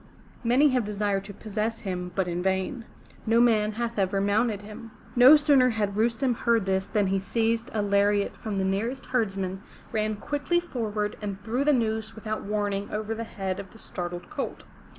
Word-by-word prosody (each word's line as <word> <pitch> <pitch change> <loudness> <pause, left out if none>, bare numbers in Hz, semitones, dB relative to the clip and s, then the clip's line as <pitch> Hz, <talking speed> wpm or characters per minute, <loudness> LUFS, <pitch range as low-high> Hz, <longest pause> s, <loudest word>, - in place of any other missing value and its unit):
Many 255 +5 +5
have 255 -3 +1
desired 205 -1 -1
to 200 - -8
possess 215 +2 -3
him, 180 -2 -4
but 190 -2 +1
in 175 0 -2
vain. 190 +6 -1 0.4
No 230 +1 +4
man 215 -3 +3
hath 235 0 -3
ever 195 0 +1
mounted 205 +1 +1
him.'' 215 +2 -9 0.3
No 250 +5 +9
sooner 285 -4 +5
had 210 -3 -1
Rustem 230 +3 +1
heard 230 -3 +1
this 190 0 0
than 210 -2 +1
he 195 0 +1
seized 225 +3 0
a 215 -2 0
lariat 200 0 +2
from 215 -2 -5
the 190 -1 0
nearest 225 +8 -1
herdsman, 195 -6 -1 0.3
ran 215 -1 0
quickly 290 +10 0
forward, 215 -10 -3
and 200 -2 -4
threw 230 +7 -1
the 300 - +4
noose 220 -3 0
without 215 0 -4
warning 205 -1 -2
over 215 +1 -3
the 230 +1 -4
head 195 -3 -4
of 195 -1 -8
the - - -14
startled 175 -4 -6
colt. - - -4
215 Hz, 185 wpm, -27 LUFS, 200-230 Hz, 0.4 s, No